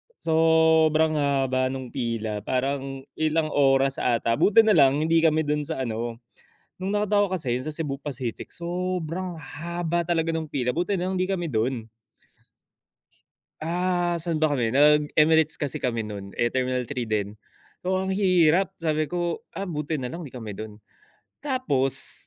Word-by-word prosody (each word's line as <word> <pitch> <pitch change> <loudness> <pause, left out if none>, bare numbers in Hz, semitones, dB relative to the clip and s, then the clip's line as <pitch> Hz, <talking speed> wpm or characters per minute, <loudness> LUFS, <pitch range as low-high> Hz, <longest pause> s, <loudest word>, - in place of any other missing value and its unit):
sobrang 160 -1 +3
haba 135 -2 +1
nung 130 -2 -5
pila, 115 -4 -2
parang 135 +1 -2 0.2
ilang 155 0 +1
oras 135 -1 +3
ata, 115 -1 +1
buti 220 +2 +6
na 215 -3 +4
lang 140 -1 +5
hindi 165 +1 +3
kami 160 0 +3
dun 150 0 0
sa 135 - -5
ano 115 0 -4 0.6
nung 190 - -2
nakita 205 0 +2
ko 205 - +2
kasi 180 -8 -4
'yung - - -5
sa - - -6
Cebu 150 -3 -3
Pacific 125 -5 -5
sobrang 180 0 -3
haba 170 +3 -3
talaga 165 -1 0
nung 160 -2 -3
pila, 125 -3 -1
buti 180 +4 0
na 180 +1 -2
lang 190 - -2
'di 185 +1 0
kami 180 -3 -1
dun. 120 -3 -1 1.8
Ah, 175 +1 0
saan 165 -1 -2
ba 155 - +4
kami, 115 -2 0
nag 150 +1 +4
Emirates 160 0 +3
kasi 145 -4 -2
kami 115 -2 -1
nun, 100 -2 -6
eh, 120 - +3
terminal 130 0 -1
3 125 -4 -3
din, 105 -1 -2 0.5
oo, 185 0 +1
ang 190 - -3
hirap 185 -1 +3
sabi 155 -1 +1
ko, 175 +1 -3
ah, 195 -1 -5
buti 150 -2 -3
na 125 - -3
lang 170 +5 -7
'di 135 - -10
kami 110 -5 -7
dun. 110 -1 -8 0.6
Tapos 140 - -1
155 Hz, 165 wpm, -25 LUFS, 130-170 Hz, 1.8 s, buti